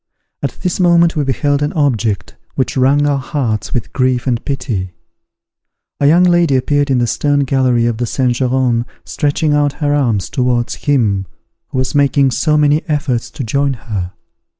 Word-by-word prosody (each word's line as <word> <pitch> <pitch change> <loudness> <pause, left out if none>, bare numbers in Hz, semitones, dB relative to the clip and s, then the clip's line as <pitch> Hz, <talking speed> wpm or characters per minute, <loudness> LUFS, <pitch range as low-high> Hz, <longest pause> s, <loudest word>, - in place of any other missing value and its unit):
At - - -3
this 180 -1 -1
moment 170 -2 +4
we 150 - 0
beheld 140 +2 0
an 145 - -1
object 115 - -1 0.2
which 130 - -1
wrung 140 +3 +3
our 145 -1 +1
hearts 130 -6 -3
with 120 - -3
grief 130 -2 0
and 120 -3 -1
pity; 120 -10 -3 1.1
a 140 - +3
young 170 +4 +5
lady 175 -5 +3
appeared 145 +2 +1
in 130 - +2
the 120 - +2
stern 145 +4 0
gallery 130 -3 +1
of 120 -2 -1
the 120 0 -2
Saint 125 +1 0
Geran, 125 -2 0 0.2
stretching 150 0 0
out 145 -1 +1
her 145 0 -1
arms 115 - 0
towards 125 -2 0 0.2
him 105 -9 +1 0.4
who - - -6
was 130 -1 -1
making 140 -1 +3
so 150 +5 +1
many 150 +1 +3
efforts 145 -6 -1
to 150 -4 -6
join 140 +4 0
her. 100 -7 -5
135 Hz, 175 wpm, -15 LUFS, 120-145 Hz, 1.1 s, young